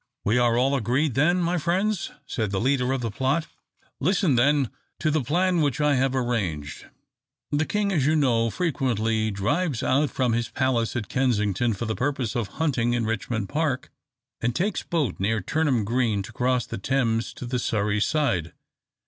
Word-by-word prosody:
"We 115 +4 +3
are 120 -1 +3
all 130 +3 +2
agreed, 130 +3 +1
then, 175 +8 +3
my 175 +1 +1
friends?" 185 +5 0 0.2
said 110 -6 -2
the 95 -1 -1
leader 130 +1 +1
of 135 -1 -1
the 115 -2 -2
plot. 135 +8 0 0.5
"Listen, 180 -1 +2
then, 135 +1 +3 0.3
to 155 - 0
the 155 0 +1
plan 175 +5 +2
which 145 -4 0
I 150 -1 +3
have 135 0 +1
arranged. 95 - -2 0.6
The 150 +2 +1
king, 205 -1 0
as 145 -7 +1
you 155 - +3
know, 120 -6 +2
frequently 115 - 0
drives 135 - -1
out 140 +3 +2
from 125 -3 0
his 115 0 -1
palace 130 -4 0
at 115 -5 -2
Kensington 115 -3 +1
for 120 - -4
the 110 - -1
purpose 130 -4 -1
of 115 -4 -1
hunting 125 -7 +1
in 120 -2 0
Richmond 110 -1 -2
Park, 150 -2 -1 0.5
and 120 0 0
takes 195 +3 0
boat 150 - -1
near 110 +4 +1
Turnham 130 - 0
Green 115 -3 0
to - - -11
cross 125 -1 +1
the - - -6
Thames 115 -1 0
to - - -7
the 125 +1 -2
Surrey 105 -2 0
side. 95 - 0
125 Hz, 180 wpm, -25 LUFS, 115-150 Hz, 0.6 s, We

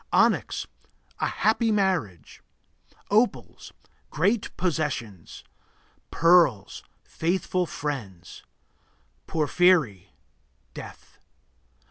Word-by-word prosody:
Onyx - - +2 0.5
A - - 0
happy 225 +1 +1
marriage. 185 - -2 0.7
Opals 220 +4 0 0.4
Great 215 +1 0
possessions. 140 - -3 0.7
Pearls 165 - +3 0.2
Faithful 180 +1 -2
friends. 105 - -6 0.9
Porphyry 155 - +2 0.6
Death. - - -12
165 Hz, 60 wpm, -25 LUFS, -, 0.9 s, Pearls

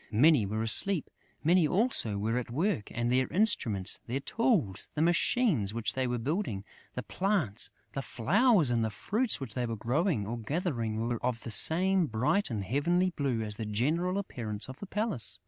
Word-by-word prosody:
Many 120 0 +4
were 110 +2 -2
asleep; 165 - +1 0.3
many 170 +1 +4
also 180 - +2
were 110 +4 -1
at 125 - -7
work; 155 - -1
and 120 +1 -1
their 130 +1 +2
instruments, 115 - +1
their 125 +4 -2
tools, 165 - 0
the 150 - 0
machines 170 - +2
which 115 -2 -1
they 130 -1 -1
were 120 0 -1
building, 120 - -2 0.3
the 125 - -4
plants, 180 - -2 0.2
the 135 - -3
flowers 150 - +2
and 115 -1 +1
the 110 - 0
fruits 215 - -1
which 130 -5 -6
they 125 -1 -2
were 115 - -3
growing 125 - 0
or 120 +3 -4
gathering 115 - -2
were 120 -1 -3
of 120 -2 -2
the 115 - -5
same 185 - +4
bright 130 - 0
and 110 -5 -3
heavenly 170 - +1
blue 135 -8 -2
as 105 -1 -3
the 110 - -4
general 160 - 0
appearance 110 - -4
of 130 +2 -10
the 200 - -8
palace. 210 - -1
130 Hz, 180 wpm, -30 LUFS, 110-180 Hz, 0.3 s, Many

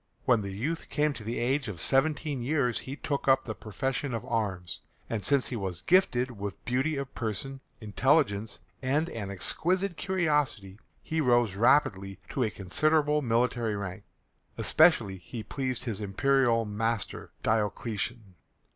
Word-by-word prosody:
When 120 -3 +4
the 100 - -5
youth 145 +12 -3
came 150 0 +1
to 115 - -9
the 115 +3 -3
age 135 +3 0
of 100 -6 -6
seventeen 145 - +1
years 125 -2 +1
he 135 - -6
took 145 -2 -3
up 130 0 +4
the 110 - -3
profession 125 +6 -3
of 115 +1 -5
arms, 100 -8 -2 0.3
and 110 -3 -3
since 140 -2 +3
he 125 - -3
was 95 -4 -3
gifted 130 - +3
with 100 -5 -7
beauty 130 +5 0
of 140 0 -5
person, 130 +5 -4 0.2
intelligence, 110 -1 +1 0.2
and 145 +6 +1
an 105 -4 -5
exquisite 180 - 0
courtesy, 150 - 0 0.2
he 160 0 -1
rose 120 -6 +3
rapidly 100 -4 +2
to 135 - -2
a 110 - +1
considerable 150 - +1
military 120 -2 +1
rank. 100 0 -5 0.5
Especially 115 - +4
he 110 +5 -7
pleased 130 +3 -3
his 110 -5 -3
imperial 115 +3 +2
master, 110 +1 -2
Diocletian. 110 0 -1
120 Hz, 145 wpm, -29 LUFS, 105-140 Hz, 0.5 s, When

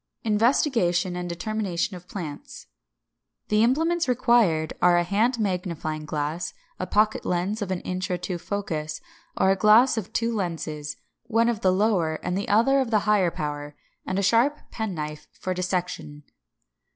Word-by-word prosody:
§ - - -47
3. 220 - -1
INVESTIGATION 210 - +2
AND 180 0 -4
DETERMINATION 190 0 -2
OF 180 0 -12
PLANTS. 160 -8 -7 0.9
570. - - +3
=The - - +5
Implements= 325 +7 +2
required 225 -11 +3
are 175 -1 +5
a 175 - +3
hand 215 +8 +1
magnifying 175 -7 -2
glass, 150 +3 -3 0.2
a 185 - -3
pocket 215 +3 +2
lens 185 +5 -1
of 200 - -3
an 185 -2 -2
inch 185 +1 -3
or 180 - 0
two 175 0 -4
focus, 165 -5 -3 0.4
or 190 - +4
a - - +3
glass 220 +6 +5
of 215 -3 -4
two 230 0 0
lenses, 155 -6 -4 0.3
one 230 0 +3
of 225 -3 -2
the 185 - +4
lower 185 -5 +2
and 180 - -1
the 200 - -3
other 235 +7 +4
of 260 -3 0
the 215 -3 +3
higher 205 -4 +3
power; 145 -2 -5 0.3
and 185 - -3
a 200 - +1
sharp 235 +9 +3
penknife 155 -9 -4
for 185 - -3
dissection. 180 -5 -3
185 Hz, 170 wpm, -25 LUFS, 170-220 Hz, 0.9 s, =The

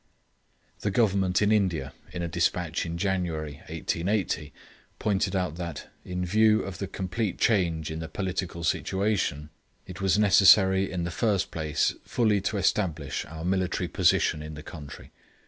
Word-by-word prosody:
The 100 - -1
Government 95 -4 +2
of 105 - +3
India, 90 -10 +1 0.2
in 85 - -4
a - - -1
despatch 85 +1 -1
in 85 +1 -4
January, 85 -6 -2
1880, 85 -4 -1 0.5
pointed 100 -2 0
out 90 -4 -1
that, 85 -4 -6
in 90 0 -3
view 110 +3 +4
of 95 -3 -7
the 100 - -3
complete 95 +2 -3
change 85 -8 +1
in 80 - -4
the 80 - -5
political 90 -1 -3
situation, 95 -4 -1 0.3
it 90 +1 -9
was 95 -1 +3
necessary, 95 -1 +6
in 90 -2 -2
the 85 - -3
first 100 +1 0
place, 80 -1 0
fully 110 -4 +1
to 105 - -1
establish 85 -6 0
our 80 +1 -8
military 95 -1 0
position 75 - +2
in 75 0 -7
the 75 - -9
country. 75 -4 -10
90 Hz, 150 wpm, -27 LUFS, 80-100 Hz, 0.5 s, necessary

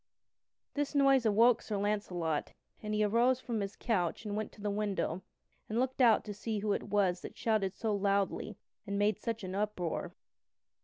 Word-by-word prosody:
This 290 0 -2
noise 275 -4 +5
awoke 225 +3 +5
Sir 210 - -3
Launcelot, 190 -6 -1 0.3
and 215 0 -2
he 210 - +2
arose 235 +4 +3
from 235 -3 -3
his 200 0 -4
couch 195 -3 -1
and 205 -1 -3
went 215 0 -3
to - - -17
the 205 0 -2
window 200 -4 -1 0.5
and 220 - -2
looked 260 +1 0
out 230 -3 +5
to 210 - -5
see 215 +2 -3
who 205 0 0
it - - -4
was 190 -4 +2
that - - -9
shouted 215 -4 0
so 220 -2 -1
loudly 200 0 0 0.3
and 200 0 -2
made 205 0 +2
such 230 -2 -3
uproar. 185 -3 -2
210 Hz, 175 wpm, -32 LUFS, 200-225 Hz, 0.5 s, noise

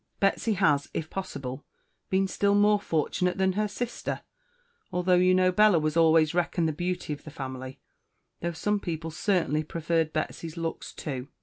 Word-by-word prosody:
"Betsy 200 +3 +2
has, 150 -8 +2
if 160 -1 -3
Possible, 140 -8 -5 0.5
been 190 0 +2
still 200 +1 +2
More 205 0 +4
fortunate 180 +1 0
than 190 0 +2
her 210 +2 0
Sister, 240 +3 -4 0.7
although 180 0 +1
you 180 +1 +5
know 185 0 +4
Bella 210 -1 +5
was 155 -1 0
always 160 -1 +5
reckoned 170 -1 +1
the 155 - -1
Beauty 175 -1 -2
of 145 - -9
the - - -9
Family, 130 -3 -7 0.6
though 170 - -2
some 205 +6 0
people 165 -3 -4
certainly 160 -4 +1
preferred 165 0 -1
Betsy's 160 +1 -4
Looks 165 -1 -4
too. 135 -4 -5
170 Hz, 165 wpm, -27 LUFS, 155-190 Hz, 0.7 s, you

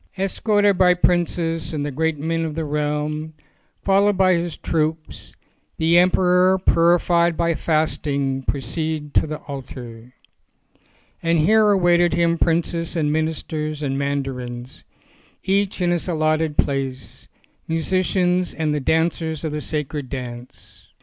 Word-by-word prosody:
Es 195 0 -2
corted 205 -3 +2
by 180 -1 +5
princes 170 -2 0
and 145 -1 -2
the 145 - -3
great 160 +3 -1
men 165 +3 -2
of 155 -2 -4
the 160 -1 -2
realm, 150 +1 -2 0.5
followed 200 0 +3
by 185 -1 +4
his 170 -1 -2
troops, 160 0 -3 0.4
the 165 +2 +4
emperor 180 +1 +4
purified 170 -1 +3
by 170 0 +1
fasting 145 -4 -1
proceeded 150 +3 -3
to - - +2
the 155 0 -4
altar. 125 -4 -9 1.1
And 165 0 +1
here 215 +7 +4
awaited 175 -3 +3
him 170 -1 +1
princes 165 0 0
and 150 -3 0
ministers 155 -1 -3
and 135 -1 -1
mandarins, 135 -3 -4 0.6
each 195 0 0
in 175 -1 +2
his 175 0 -1
allotted 155 -2 0
place, 135 -2 -2 0.4
musicians 180 +2 0
and 155 -2 -1
the 150 - 0
dancers 160 +1 0
of 160 - -2
the 150 0 -3
sacred 150 -3 -4
dance. 125 -2 -9
160 Hz, 130 wpm, -21 LUFS, 150-175 Hz, 1.1 s, by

